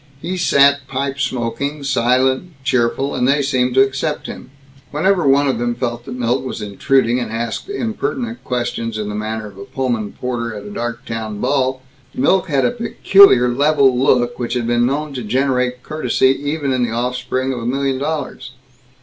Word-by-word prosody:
He 175 +5 -4
sat 140 -5 +3
pipe 135 +1 -3
smoking, 135 +3 -2
silent, 130 +5 +1
cheerful, 130 +1 0
and 125 - +1
they 140 +1 +3
seemed 130 -2 0
to 135 - +7
accept 140 +3 -2
him. - - -8 0.4
Whenever 175 +2 +1
one 140 +1 +4
of 130 -4 0
them 120 0 -1
felt 120 -1 -3
that 130 - -6
Milt 125 +1 0
was 130 - -5
intruding, 120 +4 +1
and 120 -3 -4
asked 115 - -4
impertinent 235 - -3
questions 120 -2 -3
in 105 -1 -3
the - - -4
manner 110 +1 -3
of 100 -2 -11
a - - -6
Pullman 120 -6 -2
porter 115 -3 -4
at 105 -1 -8
a 105 - -8
Darktown 115 -2 -5
ball, 130 0 0 0.3
Milt 185 +8 +2
had 140 -5 +1
a - - +2
peculiar 200 - +5
level 140 0 +3
look 125 -1 +2
which 120 0 -2
had 120 -2 -1
been 120 +1 +2
known 145 +2 -2
to 130 - -4
generate 125 +1 0
courtesy 135 -3 +1
even 145 -3 -1
in 130 - 0
the 120 - +1
offspring 125 +2 -2
of 125 - -4
a 115 - -6
million 135 +1 0
dollars. 145 -3 -4
130 Hz, 180 wpm, -18 LUFS, 120-140 Hz, 0.4 s, to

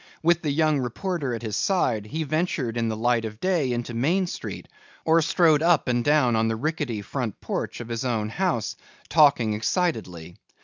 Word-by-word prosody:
With 170 +1 +3
the 155 - -2
young 155 0 +2
reporter 135 - -2
at 115 - -7
his 110 -2 -3
side, 120 - 0
he 160 +8 -3
ventured 155 -6 -1
in 115 -1 0
the 110 - -3
light 120 0 +1
of 110 -1 -6
day 170 -7 +1
into 120 0 -3
Main 165 +11 +1
Street 175 - -6 0.4
or 165 +1 +4
strode 160 -2 +3
up 165 -3 +3
and 120 -1 +1
down 145 -5 +3
on 110 0 +2
the 110 - 0
rickety 135 -4 -2
front 120 -1 -4
porch - - -4
of 120 -1 -7
his 115 0 -3
own 110 -4 -1
house, 165 - -1 0.3
talking 140 -8 +4
excitedly. 105 - -2
125 Hz, 185 wpm, -25 LUFS, 115-160 Hz, 0.4 s, or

